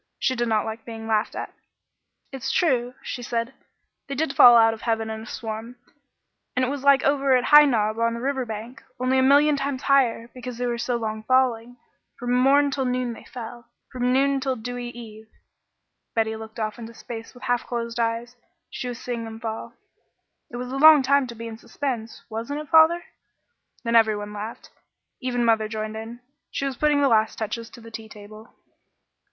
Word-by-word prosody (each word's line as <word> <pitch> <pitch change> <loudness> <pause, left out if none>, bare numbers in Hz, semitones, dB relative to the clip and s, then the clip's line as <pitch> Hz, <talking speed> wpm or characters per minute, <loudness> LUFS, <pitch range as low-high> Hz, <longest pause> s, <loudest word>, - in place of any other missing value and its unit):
She 260 - 0
did 240 -1 -1
not 220 -2 +1
like 220 0 -6
being 225 -1 -8
laughed 220 -1 0
at. - - -6 0.8
"It's 270 -3 -4
true," 255 -7 +1
she 250 - -5
said; 235 +1 -3 0.5
"they 275 - -4
did 290 0 -1
fall 240 -1 +9
out 225 -1 +5
of 220 - -10
heaven 225 -1 -1
in 220 0 -5
a - - -9
swarm, 225 +2 -6 0.8
and 255 +1 +2
it - - -2
was 280 -1 -4
like 280 -1 +5
over 275 -1 +3
at 250 - -1
High 295 +2 +8
Knob 220 -4 +1
on 230 0 +1
the - - -5
river 265 +1 -1
bank, 225 +2 -8 0.2
only 255 +1 +2
a - - +4
million 285 +3 +5
times 275 -1 -3
higher, 255 -4 +2
because 250 -1 -7
they 245 - -2
were 240 -1 -2
so 245 +1 -1
long 220 -2 -3
falling. 245 0 +1 0.4
'From 245 0 -2
morn 275 +3 +4
till 265 -1 -1
noon 250 -1 -1
they - - -13
fell, 240 -1 -9 0.2
from 250 0 0
noon 275 +1 +2
till 265 -1 -1
dewy 245 +1 -5
eve.'" 220 -2 -11 0.9
Betty 220 -1 +1
looked 220 +1 -9
off 215 +1 -3
into 230 0 -9
space 225 +1 -9
with 245 - -14
half 245 -2 0
closed 235 -1 -4
eyes. 230 +1 -1 0.4
She 250 - -5
was 245 -1 -5
seeing 240 -2 -4
them 225 0 -8
fall. 225 -1 -6 0.7
"It - - -10
was 250 +1 -5
a 270 - -3
long 305 -1 +8
time 280 0 +3
to 235 - -8
be 230 +1 -8
in 225 -1 -8
suspense, 235 -6 -5
wasn't 230 +7 -4
it, 305 - -11
father?" 325 +2 +6 0.8
Then 230 -1 0
every 220 -2 +5
one 205 0 -7
laughed. 210 +2 -7 0.5
Even 245 -2 0
mother 220 -1 +3
joined 215 0 -4
in. 225 +2 -8 0.3
She 275 - -3
was 270 -1 -2
putting 295 +2 +2
the - - +5
last 220 -3 +2
touches 225 +1 -4
to 235 - -14
the 230 0 -12
tea 220 0 -8
table. 215 +2 -13
240 Hz, 200 wpm, -24 LUFS, 225-260 Hz, 0.9 s, fall